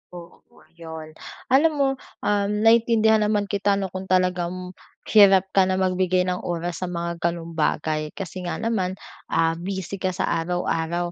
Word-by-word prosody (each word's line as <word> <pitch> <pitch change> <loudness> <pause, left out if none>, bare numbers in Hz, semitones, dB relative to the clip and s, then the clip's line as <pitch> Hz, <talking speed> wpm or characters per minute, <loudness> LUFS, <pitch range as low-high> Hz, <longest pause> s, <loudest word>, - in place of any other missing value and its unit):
Oo, 170 -1 -14 0.2
'yon. 160 -1 -8 0.4
Alam 290 +5 +5
mo, 280 -2 +2 0.4
um, 205 -1 +1
naintindihan 225 -1 +4
naman 210 -1 +1
kita 200 0 0
'no, 195 -2 -3
kung 190 0 -6
talagang 180 0 0 0.3
hirap 195 -3 +6
ka 190 -1 +4
na 185 - +1
magbigay 185 -1 +1
ng 180 0 -1
oras 175 0 -3
sa 185 - -2
mga 170 -1 -4
gano'ng 170 -1 -2
bagay 155 -1 -1
kasi 185 -1 -6
nga - - -2
naman, 205 -5 -1 0.3
ah, 165 0 +1
busy 190 +1 -5
ka 185 -1 -1
sa 185 - -1 0.2
araw-araw. 175 0 -2
185 Hz, 155 wpm, -23 LUFS, 170-200 Hz, 0.4 s, hirap